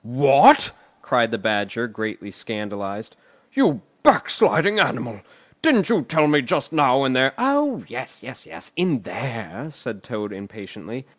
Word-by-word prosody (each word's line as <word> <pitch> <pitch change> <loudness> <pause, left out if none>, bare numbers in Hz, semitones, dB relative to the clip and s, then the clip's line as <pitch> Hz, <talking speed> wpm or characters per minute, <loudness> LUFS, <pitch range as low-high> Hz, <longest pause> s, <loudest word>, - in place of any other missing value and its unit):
"What?" 135 +4 +5 0.3
cried 120 -3 +1
the 115 - -3
Badger, 105 +2 -2
greatly 110 -2 -7
scandalised. 105 0 -7 0.4
"You - - +2 0.2
backsliding 205 +1 +3
animal, - - -1 0.4
didn't 250 -11 +3
you 230 - +2
tell 155 -2 +1
me 150 0 +4
just 125 +5 -2
now, 140 -3 +3
in 130 -1 0
there——" 130 +1 +3
"Oh, 280 +3 0
yes, - - -8
yes, - - -10
in 170 -8 -1
there," 115 - -7
said 115 -8 -8
Toad 105 -2 -6
impatiently. 105 +5 -11
120 Hz, 135 wpm, -21 LUFS, 105-150 Hz, 0.4 s, What